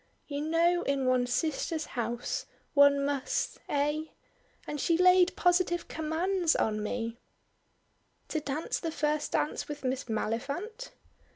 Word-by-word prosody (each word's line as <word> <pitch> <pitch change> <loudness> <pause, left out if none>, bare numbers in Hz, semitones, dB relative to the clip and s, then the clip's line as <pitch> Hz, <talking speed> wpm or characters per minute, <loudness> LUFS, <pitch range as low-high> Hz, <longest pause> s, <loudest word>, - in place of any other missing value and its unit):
You 285 -1 -3
know 335 +3 +2
in 275 -4 0
one's 250 -1 +2
sister's 315 +2 -1
house 240 0 -2 0.3
one 280 -1 +6
must 280 -2 -1
eh? 295 +2 0 0.6
And 295 -2 -4
she 335 -2 +2
laid 365 0 +5
positive 355 -1 +2
commands 330 +2 0
on 215 -1 0
me 230 +2 -3 0.5
" - - -43
"To 310 - 0
dance 295 +1 -2
the 330 - -3
first 300 -1 -1
dance 295 - 0
with 295 -1 -7
Miss 260 0 -1
Maliphant?" 280 - -3
295 Hz, 130 wpm, -30 LUFS, 265-335 Hz, 0.6 s, one